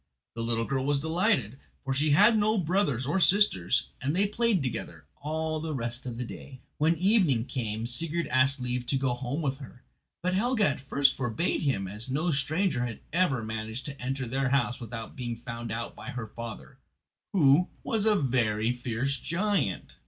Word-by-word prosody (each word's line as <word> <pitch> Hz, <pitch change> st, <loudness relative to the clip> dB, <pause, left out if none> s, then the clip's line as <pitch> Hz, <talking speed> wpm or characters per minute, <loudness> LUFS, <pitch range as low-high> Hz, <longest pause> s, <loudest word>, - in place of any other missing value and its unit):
The 115 Hz, -, -5 dB
little 115 Hz, 0 st, 0 dB
girl 135 Hz, 0 st, -1 dB
was 140 Hz, 0 st, +2 dB
delighted, 160 Hz, -, +1 dB, 0.2 s
for 135 Hz, -, -1 dB
she 145 Hz, +3 st, +1 dB
had 210 Hz, +10 st, +6 dB
no 215 Hz, +1 st, +2 dB
brothers 165 Hz, -, +1 dB
or 155 Hz, +8 st, +1 dB
sisters, 180 Hz, -, +3 dB
and 140 Hz, +4 st, 0 dB
they 200 Hz, +2 st, +4 dB
played 210 Hz, -4 st, +1 dB
together 85 Hz, -, -4 dB
all 155 Hz, +1 st, -2 dB
the 155 Hz, -1 st, -3 dB
rest 120 Hz, +1 st, -3 dB
of 120 Hz, -2 st, -5 dB
the 125 Hz, -, -2 dB
day. 130 Hz, +2 st, -9 dB, 0.2 s
When 160 Hz, +3 st, +3 dB
evening 180 Hz, -, +3 dB
came 115 Hz, -4 st, -3 dB
Sigurd 165 Hz, +7 st, -1 dB
asked 135 Hz, +2 st, +3 dB
leave 125 Hz, 0 st, -2 dB
to 135 Hz, -, +1 dB
go 130 Hz, -2 st, 0 dB
home 130 Hz, +6 st, -3 dB
with 135 Hz, -1 st, -1 dB
her, 130 Hz, -2 st, -12 dB, 0.4 s
but 185 Hz, +1 st, +1 dB
Helga 220 Hz, +2 st, +2 dB
at 140 Hz, -, -1 dB
first 135 Hz, 0 st, +3 dB
forbade 130 Hz, +7 st, -1 dB
him, 130 Hz, -10 st, 0 dB
as 105 Hz, +6 st, -4 dB
no 155 Hz, +6 st, 0 dB
stranger 150 Hz, -1 st, +1 dB
had 120 Hz, -3 st, -5 dB
ever 165 Hz, -9 st, +2 dB
managed 110 Hz, +3 st, -5 dB
to 140 Hz, -3 st, -5 dB
enter 130 Hz, 0 st, -2 dB
their 135 Hz, +2 st, 0 dB
house 130 Hz, -2 st, +1 dB
without 115 Hz, -1 st, -7 dB
being 120 Hz, -3 st, -4 dB
found 115 Hz, -1 st, -6 dB
out 115 Hz, +2 st, -4 dB
by -, -, -8 dB
her 125 Hz, -2 st, -4 dB
father, 115 Hz, +1 st, -9 dB, 0.5 s
who 160 Hz, -1 st, +5 dB, 0.2 s
was 220 Hz, -3 st, +1 dB
a 215 Hz, -, +5 dB
very 120 Hz, -, +1 dB
fierce 125 Hz, +3 st, -2 dB
giant. 185 Hz, -, -1 dB
135 Hz, 185 wpm, -28 LUFS, 120-165 Hz, 0.5 s, had